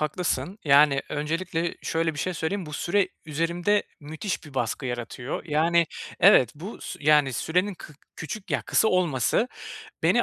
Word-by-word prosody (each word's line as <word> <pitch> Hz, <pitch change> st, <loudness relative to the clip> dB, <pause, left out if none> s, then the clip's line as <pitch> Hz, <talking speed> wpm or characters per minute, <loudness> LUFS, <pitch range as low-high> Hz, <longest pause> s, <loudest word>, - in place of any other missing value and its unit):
haklısın. 180 Hz, +5 st, -2 dB
Yani, 140 Hz, -1 st, +5 dB
öncelikle 165 Hz, +3 st, -2 dB
şöyle 165 Hz, -1 st, 0 dB
bir 145 Hz, -, -8 dB
şey 185 Hz, -, -2 dB
söyleyeyim, 175 Hz, +3 st, -2 dB
bu 150 Hz, -, -9 dB
süre 185 Hz, +5 st, +1 dB, 0.2 s
üzerimde 170 Hz, +6 st, +1 dB, 0.2 s
müthiş 160 Hz, +7 st, -4 dB
bir 145 Hz, -3 st, -13 dB
baskı 130 Hz, +2 st, -2 dB
yaratıyor. 120 Hz, +1 st, -5 dB
Yani 170 Hz, +2 st, +2 dB, 0.3 s
Evet, 145 Hz, -, +6 dB
bu 180 Hz, +9 st, -8 dB
sü -, -, -7 dB
yani, 150 Hz, -2 st, +4 dB
sürenin 180 Hz, -, 0 dB
kı 155 Hz, -, -12 dB, 0.2 s
küçük, 190 Hz, +6 st, -7 dB
ya, -, -, 0 dB
kısa 220 Hz, -, +2 dB
olması 180 Hz, -, +1 dB, 0.5 s
beni -, -, +4 dB
160 Hz, 155 wpm, -26 LUFS, 145-180 Hz, 0.5 s, Evet